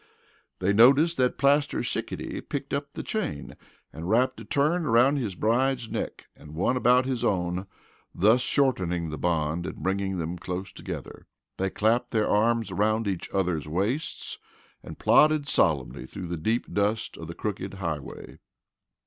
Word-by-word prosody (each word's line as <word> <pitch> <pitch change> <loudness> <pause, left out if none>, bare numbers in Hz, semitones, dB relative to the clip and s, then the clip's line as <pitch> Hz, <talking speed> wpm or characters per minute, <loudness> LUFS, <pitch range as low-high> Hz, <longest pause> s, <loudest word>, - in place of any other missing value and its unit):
They 95 +2 +1
noticed 140 +10 +6
that 125 -1 +1
Plaster 140 +1 +2
Sickety - - -4
picked 140 -1 -5
up 140 0 -3
the - - -5
chain 215 - -4 0.4
and 80 +3 -6
wrapped 125 +4 +2
a - - -8
turn 155 +5 +1
around 130 +2 +4
his 110 -9 -3
bride's 120 +3 +1
neck - - -4
and 75 +1 -13
one 95 +9 +1
about 125 +1 +4
his 130 -3 -2
own, 90 -3 0 0.4
thus 110 +7 +4
shortening 90 - +1
the 75 - -5
bond 85 0 0
and - - -5
bringing 95 0 -1
them 85 +1 -4
close 90 +2 -5
together. - - -8 0.3
They 95 0 0
clamped 115 +5 +1
their 110 -2 +1
arms 115 0 +2
around 110 +3 +1
each 95 -3 -3
other's 90 -6 -1
waists, 100 - -2 0.4
and - - -10
plodded 150 -1 +4
solemnly 75 - +1
through 90 - -7
the 85 - -2
deep 110 +9 -1
dust 105 +2 0
of 85 - -8
the 85 - -7
crooked 100 -2 -4
highway. 85 -7 -6
105 Hz, 155 wpm, -26 LUFS, 90-130 Hz, 0.4 s, noticed